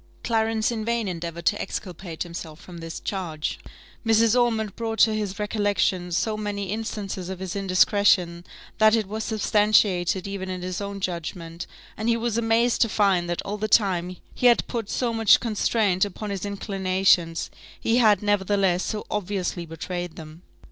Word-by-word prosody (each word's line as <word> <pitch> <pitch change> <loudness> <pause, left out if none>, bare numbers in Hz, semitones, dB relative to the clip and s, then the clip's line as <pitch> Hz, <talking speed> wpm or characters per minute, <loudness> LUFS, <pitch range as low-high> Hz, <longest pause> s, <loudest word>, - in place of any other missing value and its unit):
Clarence 225 -1 +1
in 225 -2 -3
vain 235 -1 -1
endeavoured 170 -1 -5
to 205 - +2
exculpate 180 -3 -5
himself 170 -2 -8
from 175 -2 -11
this 165 0 -6
charge: 170 -5 -4 0.4
Mrs. 225 0 +4
Ormond 225 -4 +1
brought 225 -1 -3
to 220 - +5
his 205 -2 -3
recollection 205 -4 0
so 215 +5 0
many 205 -2 -3
instances 205 -4 -4
of 190 - -5
his 190 0 -5
indiscretion, 190 -2 +3 0.4
that 215 0 +6
it 220 -2 0
was 215 +2 -4
substantiated 205 -4 +2
even 195 -1 -5
in 185 -1 -4
his 185 +1 -4
own 200 0 -5
judgment, 170 -1 -5 0.3
and 220 +2 -2
he 230 - +3
was 230 -1 -2
amazed 230 +1 +2
to 230 - +4
find 190 -5 +2
that 175 - -2
all 205 +1 -4
the 215 - -1
time 185 -4 +2 0.2
he 250 - +3
had 240 - +4
put 230 -4 -4
so 240 -2 -1
much 225 -2 +5
constraint 215 -4 +1
upon 205 +1 -4
his 200 0 -3
inclinations, 190 -4 +1 0.3
he 230 +1 +1
had, 210 -5 +4
nevertheless, 195 -3 +2
so 215 -1 -3
obviously 190 -4 -2
betrayed 175 +2 -5
them. 155 +1 -11
200 Hz, 165 wpm, -25 LUFS, 180-220 Hz, 0.4 s, that